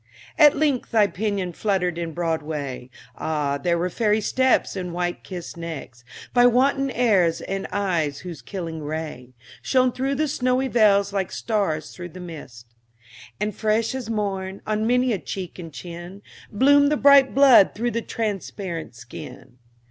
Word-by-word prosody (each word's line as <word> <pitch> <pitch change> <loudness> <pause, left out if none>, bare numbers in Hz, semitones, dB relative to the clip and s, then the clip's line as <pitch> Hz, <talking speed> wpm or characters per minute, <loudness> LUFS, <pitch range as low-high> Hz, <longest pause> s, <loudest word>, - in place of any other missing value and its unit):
At 295 -3 +7
length 285 -4 0
thy 220 -2 +4
pinion 200 -1 -2
fluttered 180 -3 -1
in 170 -1 -3
Broadway, 150 -6 -3 0.3
Ah, 145 -3 -2
there 170 +3 +1
were 180 +2 -1
fairy 215 +1 +1
steps, 260 +3 +1
and 180 -2 -5
white 175 0 -2 0.4
necks 160 -8 -7
kissed 120 - -16
By 245 0 +6
wanton 275 +3 +2
airs, 200 -10 +2
and 195 0 -4
eyes 170 -8 -1
whose 175 -5 -8
killing 165 -5 -6
ray 150 -5 -6 0.3
Shone 255 -1 +2
through 270 +3 -2
the 310 +2 0
snowy 260 -2 0
veils 200 -4 +3
like 195 -2 -1
stars 195 -9 -2
through 175 -1 -8
mist; 160 -10 -10 0.7
And 210 +1 -1
fresh 220 +3 0
as 255 -4 -5
morn, 195 -3 -3
on 215 +1 -1
many 250 0 +2
a 200 - -2
cheek 185 -1 -6
and 165 -2 -8
chin, 175 +5 -9 0.3
Bloomed 285 +6 +4
the 300 - +2
bright 280 -2 +6
blood 270 -8 +6
through 240 +4 -1
the 230 - -2
transparent 195 - -4
skin. 120 +1 -11
195 Hz, 155 wpm, -23 LUFS, 165-240 Hz, 0.7 s, At